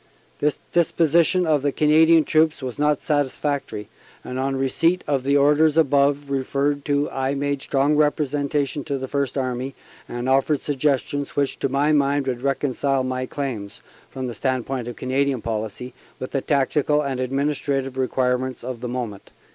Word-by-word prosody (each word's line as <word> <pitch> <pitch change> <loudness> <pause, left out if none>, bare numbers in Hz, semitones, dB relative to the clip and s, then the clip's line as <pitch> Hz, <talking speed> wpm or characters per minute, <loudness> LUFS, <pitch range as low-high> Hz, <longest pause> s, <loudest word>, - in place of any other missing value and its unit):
This 150 -1 +1
disposition 170 +1 +3
of 155 -3 +2
the 145 0 +1
Canadian 160 +2 +5
troops 155 -2 +2
was 130 +1 -5
not 150 -1 +1
satisfactory, 145 - -1 0.4
and 125 +1 -5
on 135 +1 -1
receipt 165 +7 +1
of 135 -3 0
the 140 +1 +3
orders 150 +2 +4
above 140 -1 +2
referred 140 +1 0
to 145 0 +1
I 135 +1 -1
made 140 0 -1
strong 140 +2 +1
representation 145 -1 0
to 135 -3 -3
First 140 0 -2
Army, 130 0 -2 0.3
and 120 +1 -4
offered 135 +2 +2
suggestions 145 0 -1
which 140 -1 0
to 135 - 0
my 140 +3 +2
mind 140 -1 +2
would 125 -2 -2
reconcile 135 0 0
my 130 0 -2
claims 120 -9 -5 0.3
(from 130 -1 -5
the 120 - -4
standpoint 130 0 -2
of 120 - -6
Canadian 130 -1 -1
policy) 110 +2 -4 0.2
with 130 - -6
the 135 - -1
tactical 150 +2 +1
and 135 -2 -3
administrative 135 0 -1
requirements 130 0 -1
of 125 -1 -6
the 125 - -4
moment." 120 -5 -5
140 Hz, 155 wpm, -23 LUFS, 130-145 Hz, 0.4 s, Canadian